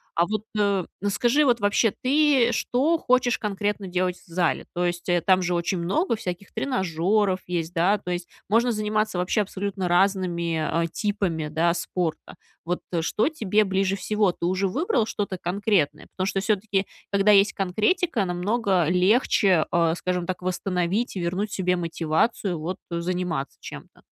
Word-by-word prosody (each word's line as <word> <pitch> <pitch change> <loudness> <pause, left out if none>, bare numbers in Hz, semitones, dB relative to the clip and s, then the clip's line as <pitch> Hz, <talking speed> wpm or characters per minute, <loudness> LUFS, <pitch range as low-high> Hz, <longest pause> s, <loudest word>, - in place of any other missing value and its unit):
А 170 +1 +2
вот, 215 0 -2 0.2
э, 200 -3 +1 0.2
скажи, 240 +8 +2
вот 245 -4 +3
вообще, 205 +2 +3
ты 275 0 +3
и - - 0
что 280 +8 +1
хочешь 250 -3 +2
конкретно 205 -1 -2
делать 180 0 -1
в - - -24
зале? 170 0 -1
То 175 +1 0
есть, 175 +1 -3
э, 175 -1 +3
там 185 -1 +3
же 180 -1 0
очень 170 +2 -1
много 230 - 0
всяких 185 -2 -6
тренажёров 190 - 0
есть, 170 -1 -3
да. 185 +4 +3
То 180 -3 -6
есть, 175 0 -4 0.2
можно 235 +4 +3
заниматься 215 -2 -1
вообще 180 +4 +1
абсолютно 195 -1 -3
разными, 170 -3 +1
э, - - -1
типами, 195 -7 -2
да, 165 +3 +1
спорта. 170 -1 -3 0.3
Вот, 175 +2 -2
э, 170 -2 0
что 210 - +1
тебе 215 - +1
ближе 195 -1 0
всего? 210 -1 +1
Ты 170 - -5
уже 185 +2 +1
выбрал 250 - 0
что-то 200 -4 -3
конкретное? 180 -5 0
Потому 185 0 -2
что 195 0 -1
всё-таки, 200 -1 0 0.3
когда 200 +1 +4
есть 200 0 +5
конкретика, 215 - 0
намного 185 0 0
легче, 185 -1 +3
э, 165 -1 +2
скажем 180 0 -2
так, 185 -1 -4
восстановить, 185 +4 -1
вернуть 185 +4 -2
себе 180 -2 0
мотивацию, 170 +2 -1
вот, 180 +5 -4
заниматься 170 -4 -3
чем-то. - - -11
190 Hz, 160 wpm, -24 LUFS, 175-210 Hz, 0.3 s, есть